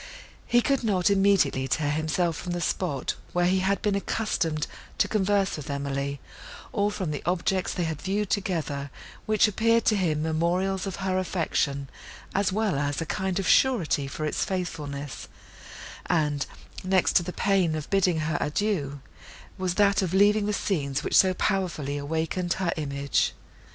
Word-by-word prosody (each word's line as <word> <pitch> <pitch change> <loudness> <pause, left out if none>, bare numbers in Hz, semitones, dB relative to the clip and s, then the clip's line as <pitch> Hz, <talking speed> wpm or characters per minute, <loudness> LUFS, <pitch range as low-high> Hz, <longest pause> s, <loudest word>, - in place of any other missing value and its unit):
He 240 - +4
could 275 -3 +1
not 200 -3 +2
immediately 195 -10 +3
tear 145 +1 0
himself 160 +2 0
from 175 +3 -4
the 175 - -2
spot, 155 -7 -1 0.2
where 175 0 +2
he 185 +1 +3
had 195 +1 0
been 210 - +2
accustomed 175 -6 -1 0.3
to 215 - +3
converse 200 -2 +1
with 150 0 -8
Emily, 140 0 -2 0.5
or 205 -1 +2
from 190 -6 -3
the 145 - -4
objects 180 +2 0
they 180 - -2
had 160 -3 -3
viewed 200 +1 -1
together, 155 -8 -1 0.4
which 215 0 +4
appeared 230 +2 +2
to 215 - +4
him 160 -6 0
memorials 180 +5 0
of 190 - -4
her 185 0 +1
affection, 150 -6 -1 0.5
as 200 -1 +1
well 205 -7 0
as 145 0 -1
a 165 - -2
kind 190 +2 -2
of 195 - -1
surety 175 - +3
for 155 +2 -4
its 150 - 0
faithfulness; 145 - -4 0.8
and, 150 -4 +1 0.4
next 185 -1 +2
to - - +4
the 175 +1 -5
pain 185 -4 +1
of 155 -2 -4
bidding 180 -5 +2
her 160 +2 -1
adieu, 145 -4 -1 0.6
was 185 -1 -1
that 200 -1 +4
of 185 -1 -1
leaving 205 +1 +4
the - - +1
scenes 150 -8 -1
which - - -1
so 185 -1 +5
powerfully 170 -9 -1
awakened 160 +4 -1
her 185 -3 -1
image. 140 -2 0
175 Hz, 165 wpm, -26 LUFS, 150-195 Hz, 0.8 s, so